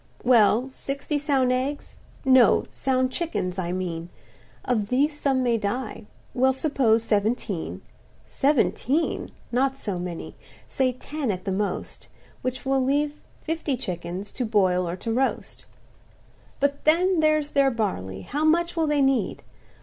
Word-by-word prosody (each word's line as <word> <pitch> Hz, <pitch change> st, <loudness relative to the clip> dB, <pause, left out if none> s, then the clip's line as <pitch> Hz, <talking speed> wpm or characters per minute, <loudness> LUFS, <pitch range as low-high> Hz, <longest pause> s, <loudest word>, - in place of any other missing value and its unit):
"Well, 240 Hz, 0 st, +4 dB
sixty 280 Hz, +3 st, -3 dB
sound 275 Hz, -4 st, +2 dB
eggs—no; 260 Hz, -2 st, +2 dB
sound 260 Hz, -1 st, 0 dB
chickens, 195 Hz, -, -2 dB
I 175 Hz, -1 st, -2 dB
mean; 175 Hz, -2 st, -3 dB, 0.6 s
Of 220 Hz, -5 st, 0 dB
these 285 Hz, +6 st, +1 dB
some 265 Hz, -2 st, +1 dB
may 235 Hz, -2 st, +2 dB
die—we'll 245 Hz, +4 st, -2 dB
suppose 260 Hz, -5 st, +2 dB
seventeen— 210 Hz, -4 st, -1 dB, 0.4 s
Seventeen!—not 270 Hz, -1 st, 0 dB
so 200 Hz, -8 st, -4 dB
many—say 180 Hz, -, -4 dB
ten 285 Hz, +1 st, -4 dB
at 185 Hz, -3 st, -3 dB
the 195 Hz, -, -1 dB
most, 200 Hz, +2 st, -3 dB, 0.3 s
Which 255 Hz, +1 st, -4 dB
will 270 Hz, 0 st, +2 dB
leave 290 Hz, +3 st, 0 dB, 0.2 s
fifty 320 Hz, -4 st, -2 dB
chickens 180 Hz, -2 st, -5 dB
to 255 Hz, -, -3 dB
boil 185 Hz, -6 st, +2 dB
or 170 Hz, -, -3 dB
to 225 Hz, +5 st, -3 dB
roast. 265 Hz, +3 st, -2 dB, 0.9 s
"But 280 Hz, 0 st, 0 dB
then 350 Hz, +3 st, +3 dB
there's 310 Hz, -1 st, +2 dB
their 275 Hz, -2 st, +3 dB
barley; 185 Hz, -, -3 dB
how 290 Hz, -, -3 dB
much 340 Hz, +2 st, +2 dB
will 325 Hz, -2 st, +1 dB
they 295 Hz, -2 st, +2 dB
need? 270 Hz, -1 st, +1 dB
255 Hz, 125 wpm, -25 LUFS, 205-285 Hz, 0.9 s, Well